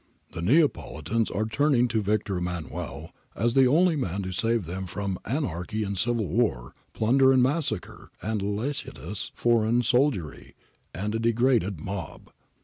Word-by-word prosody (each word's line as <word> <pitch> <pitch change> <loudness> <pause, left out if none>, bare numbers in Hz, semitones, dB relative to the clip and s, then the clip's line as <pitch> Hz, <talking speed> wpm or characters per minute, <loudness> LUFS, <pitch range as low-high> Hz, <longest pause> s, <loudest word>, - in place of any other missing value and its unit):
The 85 - -6
Neapolitans 115 - +1
are 110 - -1
turning 125 +2 +2
to 110 -1 +1
Victor 100 -1 0
Emmanuel 90 -2 -5 0.2
as 115 +2 +1
to 135 - +4
the 130 - +6
only 165 +5 +4
man 100 - -2
to 95 - -4
save 115 +2 0
them 95 +3 -5
from 95 0 -3
' - - -39
anarchy 110 - -2
and 100 -1 -3
civil 115 +2 0
war, 85 - 0 0.2
plunder 130 +4 +4
and 130 -1 +5
massacre, 130 - -2
a 110 +3 -2
licentious 105 - -3
foreign 120 0 +2
soldiery, 120 - 0 0.4
and 105 +4 -3
a 115 - -1
de 115 +1 +2
graded 115 - +2
mob.' 95 0 -6
110 Hz, 155 wpm, -26 LUFS, 95-125 Hz, 0.4 s, the